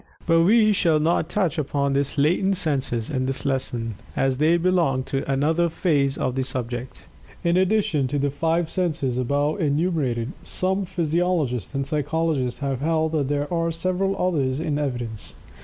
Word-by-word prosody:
But 165 -1 +4
we 215 +4 +5
shall 165 -5 +2
not 160 +1 +1
touch 180 -6 0
upon 140 -1 0
these 140 +2 -1
latent 180 +7 +2
senses 135 -7 0
in 130 -2 -1
this 135 +2 -3
lesson, 120 -4 -1 0.2
as 135 -1 +1
they 160 +4 +3
belong 170 -7 +1
to 135 +1 -3
another 160 +5 +2
phase 145 -5 +1
of 130 - -1
the 135 - -1
subject. 125 -1 -5 0.4
In 170 0 +2
addition 185 -7 +2
to 145 +3 -2
the 140 0 0
five 165 +3 0
senses 145 -9 -1
above 145 +8 0
enumerated, 145 -6 0
some 190 +1 -1
physiologists 165 - -1
and 135 0 -1
psychologists 150 -2 -1
have 135 -2 -2
held 160 0 +1
that 150 -4 0
there 145 0 0
were 165 -1 0
several 185 +3 -1
others 145 -7 0
in 155 -3 -1
evidence. 120 -6 -4
150 Hz, 160 wpm, -23 LUFS, 135-170 Hz, 0.4 s, we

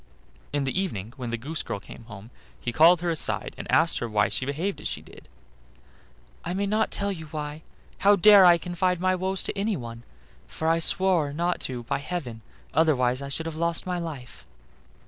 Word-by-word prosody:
In 145 -1 0
the 135 +8 -1
evening 115 - -5
when 125 -3 -6
the 120 - -2
goose 145 +7 -4
girl 100 - -5
came 115 +3 -13
home 110 0 -11 0.3
he 120 - -3
called 165 +5 +6
her 175 -1 0
aside, 160 - -1
and - - -7
asked 165 +1 +3
her 120 - -4
why 105 -1 +2
she 130 - -2
behaved 165 +8 -3
as - - -2
she - - -4
did. - - -16 1.2
"I 175 - -3
may 200 +1 0
not 215 +2 +1
tell 200 0 -1
you 160 -5 -7
why; 150 0 -6 0.4
how 205 +1 +5
dare 200 +1 +8
I 175 -1 +7
confide 180 +1 -1
my 185 +1 +2
woes 190 +1 0
to - - -3
anyone? 135 - -3 0.5
for 160 - -4
I 165 +1 +3
swore 175 -3 +3
not 170 +4 -1
to 125 -2 -5
by 120 - -2
heaven, 140 -8 -5 0.3
otherwise 130 -5 +2
I 140 - -6
should 160 +4 -4
have 165 -1 -5
lost 170 0 -1
my 180 -1 -2
life." 155 -7 -8
160 Hz, 200 wpm, -26 LUFS, 130-180 Hz, 1.2 s, dare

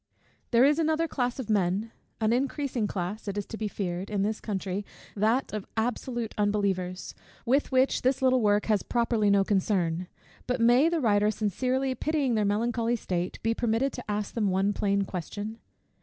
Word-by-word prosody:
_ - - -39 0.3
There 240 +2 +5
is 295 +3 +3
another 320 +1 +1
class 245 -5 -1
of 260 -5 -5
men, 205 +1 +1 0.3
an 220 0 +2
increasing 260 -3 -1
class, 195 +3 -4
it 200 0 -3
is 205 - -2
to - - -7
be 215 -1 -2
feared, 185 -2 -4
in 200 -2 0
this 215 +2 -1
country, 195 -1 -3 0.3
that 220 +5 +1
of 215 -2 -4
absolute 235 0 -2
unbelievers, 195 -3 -1 0.3
with 270 +5 +2
which 260 +1 +3
this 260 +1 +2
little 255 -1 +3
work 205 -1 +3
has 215 -2 +2
properly 230 -3 +1
no 200 -1 +4
concern: 185 -4 0 0.4
but 250 0 0
may 245 +7 +5
the 335 -2 0
writer, 210 -3 +3
sincerely 255 +6 0
pitying 285 -1 0
their 215 -2 +2
melancholy 230 +3 +1
state, 180 -5 -3
be 225 +1 +2
permitted 235 +4 0
to 245 - -8
ask 205 0 -2
them 210 -4 +1
one 190 +2 +1
plain 200 -1 +1
question? 205 +4 -5
215 Hz, 180 wpm, -28 LUFS, 200-250 Hz, 0.4 s, There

